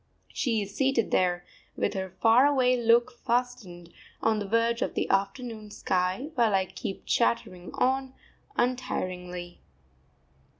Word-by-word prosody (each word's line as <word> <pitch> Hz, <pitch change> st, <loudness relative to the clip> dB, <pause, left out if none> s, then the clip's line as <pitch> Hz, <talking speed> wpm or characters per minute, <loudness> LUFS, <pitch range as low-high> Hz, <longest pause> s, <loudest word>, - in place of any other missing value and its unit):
She 225 Hz, -5 st, 0 dB
is 200 Hz, 0 st, -10 dB
seated 270 Hz, -5 st, +1 dB
there, 175 Hz, -1 st, +1 dB, 0.3 s
with -, -, -1 dB
her 190 Hz, -1 st, -3 dB
far 225 Hz, +8 st, +4 dB
away 255 Hz, -3 st, +3 dB
look 235 Hz, +1 st, +3 dB
fastened 240 Hz, -9 st, -3 dB, 0.3 s
on 220 Hz, -1 st, +1 dB
the 205 Hz, -, -4 dB
verge 230 Hz, +2 st, +1 dB
of -, -, -1 dB
the -, -, 0 dB
afternoon 215 Hz, +2 st, -2 dB
sky, 185 Hz, -, -1 dB
while 230 Hz, -6 st, +3 dB
I 190 Hz, -1 st, +2 dB
keep 195 Hz, -, -7 dB
chattering 185 Hz, -6 st, 0 dB
on 265 Hz, +1 st, 0 dB, 0.4 s
untiringly. 180 Hz, -8 st, -3 dB
225 Hz, 130 wpm, -28 LUFS, 185-250 Hz, 0.4 s, far